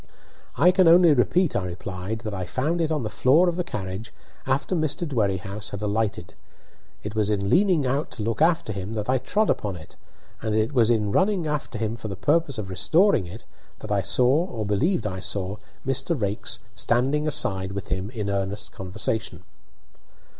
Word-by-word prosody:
"I 175 +5 +6
can 185 -1 +4
only 170 -1 +7
repeat," 165 +6 +2
I 100 - 0
replied, 90 +4 -5
"that 110 -3 -5
I 95 -2 -4
found 155 - -1
it 160 -1 0
on 150 -5 0
the - - -2
floor 135 - +4
of 175 - 0
the 180 - -1
carriage 100 - -5 0.4
after 135 +7 0
Mr. 160 +2 -1
Dwerrihouse 100 -4 -2
had 100 +1 -6
alighted. 105 -2 -2 0.7
It 105 - -5
was 105 -2 +1
in 100 -2 0
leaning 180 -6 +3
out 135 +4 -1
to 110 - -4
look 115 +5 -2
after 160 -9 +2
him 100 +2 -5
that 105 -2 -3
I 130 - +2
trod 215 - +1
upon 100 -3 -2
it, 80 -3 -13 0.4
and 110 -1 -1
it 110 +5 +1
was 120 -4 +4
in 105 -3 +1
running 190 - +2
after 150 -6 -3
him 110 +1 -2
for 110 - -6
the 100 - -5
purpose 145 - +1
of 100 -3 -5
restoring 155 - +3
it 105 +7 -10 0.3
that - - -8
I 100 -1 +2
saw 125 - +3
or 115 - -4
believed 145 - +1
I 95 -2 -3
saw, 95 +1 -2 0.3
Mr. 135 +4 0
Raikes 105 +3 -1 0.2
standing 130 +9 +1
aside 95 -9 0
with 100 +1 -6
him 95 +2 -2
in 110 -4 -4
earnest 100 +1 -2
conversation." 95 +4 -3
110 Hz, 190 wpm, -24 LUFS, 100-150 Hz, 0.7 s, only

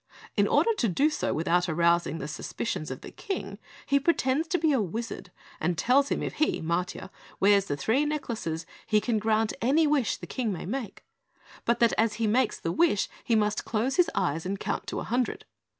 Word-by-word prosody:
In - - +3
order 460 - +3
to 230 - +2
do 285 - +2
so - - -1
without 175 +3 +1
arousing 170 -1 +2
the 140 - -5
suspicions 155 +2 -4
of - - -6
the - - -9
King, 200 - -5 0.3
he 280 0 +3
pretends 285 0 +1
to 355 - +1
be 320 -2 +2
a 265 -5 +2
Wizard 215 +1 -5 0.3
and 175 +1 0
tells 275 +7 +3
him - - -1
if - - -3
he, 305 - +1
Matiah, 175 +3 -2 0.3
wears 200 0 +5
the 145 - -3
three 225 - +2
necklaces, 235 - -3 0.2
he 215 -1 +4
can 220 0 0
grant 220 0 +1
any 290 +7 +4
wish 290 -6 +1
the - - -8
King 240 -5 -2
may 180 - -5
make, 225 +1 -5 0.6
but 235 - +2
that 235 - +5
as 220 -1 +2
he 225 +1 -1
makes 230 +3 +1
the 165 - -2
wish 320 - +2
he 230 - +2
must 210 -1 +1
close 235 +5 -1
his 360 - +4
eyes 160 +3 0
and 195 +2 -3
count - - -3
to - - -3
a - - -4
hundred. 245 +1 -1
220 Hz, 205 wpm, -28 LUFS, 180-270 Hz, 0.6 s, wears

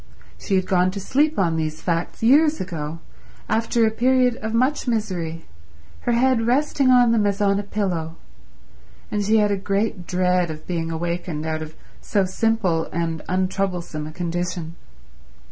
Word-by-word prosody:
She 195 - -1
had 185 -1 +2
gone 180 -1 +2
to 195 +2 -5
sleep 290 +10 +1
on 165 -4 +1
these 155 -1 -2
facts 170 +5 -2
years 300 +6 +5
ago, 160 -3 -4 0.5
after 225 +1 +2
a 220 - +2
period 250 +1 +3
of 220 0 -4
much 255 +5 +1
misery, 180 -8 -2 0.6
her - - +3
head 235 -1 +2
resting 275 +1 +2
on 245 -2 +6
them 215 -3 +3
as 200 0 -1
on 200 -1 +2
a - - 0
pillow; 180 -6 -3 1.0
and 210 -1 0
she 215 +2 +3
had 210 -1 +3
a - - +2
great 195 -1 -2
dread 180 -1 +1
of 155 0 -7
being 165 -2 -2
awakened 170 -1 -3
out 160 0 -2
of 155 0 -8 0.3
so 200 -2 +1
simple 185 -4 0
and 165 -1 -3
untroublesome 185 -4 -2
a - - -8
condition. 175 0 -3
190 Hz, 160 wpm, -22 LUFS, 170-225 Hz, 1.0 s, on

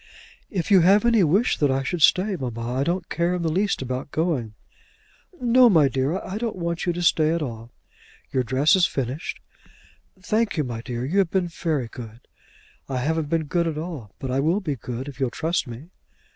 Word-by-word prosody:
"If 190 0 -3
you 195 - +8
have 200 +6 +5
any 230 -4 +4
wish 195 +10 +2
that 145 - +3
I 135 0 0
should 165 +5 -3
stay, 190 +5 +4
mamma, 120 -5 -4
I - - +2
don't 175 +2 -1
care 170 +2 0
in 175 - -3
the 160 - 0
least 195 -3 0
about 130 +2 -4
going." 140 -10 -1 0.8
"No, 245 0 +5
my 160 -8 +5
dear; 135 +7 0
I 195 +2 -6
don't 230 -1 -2
want 170 -1 -3
you 175 - +2
to 175 +1 -3
stay 155 -2 +3
at 170 - -1
all." 115 -3 -7 0.6
"Your 130 - +1
dress 130 +6 +3
is 185 -2 +4
finished." 135 +3 -4 0.8
"Thank 215 +2 0
you, 150 - +2
my 120 -3 -5
dear; 120 0 -4
you 180 +9 +1
have 190 -4 +2
been 185 -1 0
very 155 -7 -2
good." 115 0 -10 0.7
"I 130 - -2
haven't 155 +3 -1
been 165 0 +1
good 170 +3 0
at 155 -2 -3
all; 155 - -7
but 130 - -5
I 130 - +1
will 165 +8 +2
be 155 -8 -3
good 125 +2 -6
if 140 -1 -9
you'll 130 -2 +1
trust 165 +6 -1
me." 125 +9 -10
160 Hz, 210 wpm, -24 LUFS, 130-180 Hz, 0.8 s, you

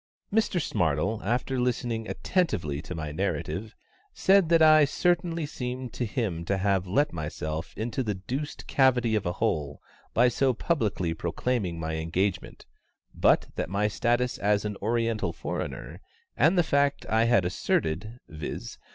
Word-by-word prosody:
Mr 215 -4 +2
SMARTLE, 85 - 0
after 125 +4 -1
listening 120 -2 -1
attentively 90 - -1
to 90 - -7
my 80 -2 -4
narrative, 105 +7 -3 0.4
said 190 -3 +4
that 165 -1 +5
I 155 -1 +7
certainly 170 +2 +1
seemed 125 -3 -5
to 125 - -2
him 100 -8 -2
to 100 +2 0
have 95 -1 +1
let 140 +11 +1
myself 80 0 -4
into 115 +3 -2
the 105 -5 -2
deuced 130 +10 -5
cavity 125 -4 +3
of 105 -4 0
a 90 - -1
hole 75 -4 -1 0.4
by 120 +2 +6
so 130 +1 +2
publicly 110 - 0
proclaiming 85 +2 -2
my 80 0 -3
engagement, 90 +4 -2 0.5
but - - +3
that - - -2
my 100 +3 +1
status 120 +3 0
as 105 0 +1
an 105 -1 -2
oriental 115 -4 0
foreigner, - - -5 0.3
and 160 +8 +4
the 175 - +5
fact 140 -2 +1
I 110 +1 +3
had 115 -6 +3
asserted 90 +4 -1
viz. 75 -6 -6
110 Hz, 150 wpm, -27 LUFS, 90-130 Hz, 0.5 s, I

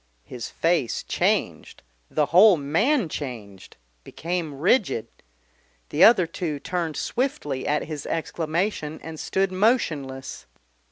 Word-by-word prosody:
His 120 - -7
face 165 -8 0
changed, - - -1 0.3
the 150 - +1
whole 190 +1 +8
man 190 - +1
changed, 115 -11 -8 0.3
became 165 -4 -4
rigid. 180 - +1 0.8
The 155 - +3
other 205 -6 +7
two 160 -3 -4
turned 170 -1 -3
swiftly 245 - -2
at 150 +1 +1
his 155 -2 -6
exclamation 160 0 -2
and 160 -1 -8
stood 190 0 0
motionless. 155 - -1
160 Hz, 110 wpm, -24 LUFS, 145-185 Hz, 0.8 s, whole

